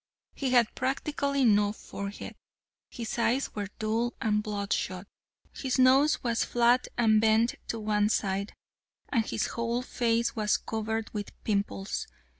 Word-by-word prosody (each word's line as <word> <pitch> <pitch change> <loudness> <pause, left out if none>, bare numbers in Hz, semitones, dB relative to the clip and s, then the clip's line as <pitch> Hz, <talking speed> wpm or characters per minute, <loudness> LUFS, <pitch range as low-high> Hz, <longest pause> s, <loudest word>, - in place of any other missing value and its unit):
He 270 - -2
had 245 -3 +4
practically 280 +1 0
no 205 -2 +4
forehead. 200 -1 -7 0.6
His 235 -1 -5
eyes 245 +4 +1
were 205 -2 -3
dull 225 +2 -1
and 210 -1 +1
bloodshot. 200 -3 -2 0.5
His 265 -1 -2
nose 265 +4 +4
was 235 -2 +1
flat 240 +1 +3
and 220 -2 +4
bent 225 +2 +3
to 230 - -3
one 210 -1 +1
side, 200 -1 -1 0.5
and 230 - +2
his - - -1
whole 235 +1 -2
face 235 -2 0
was 215 -1 +2
covered 220 0 -3
with 205 -2 -4
pimples. 200 -2 -2
225 Hz, 135 wpm, -29 LUFS, 210-245 Hz, 0.6 s, had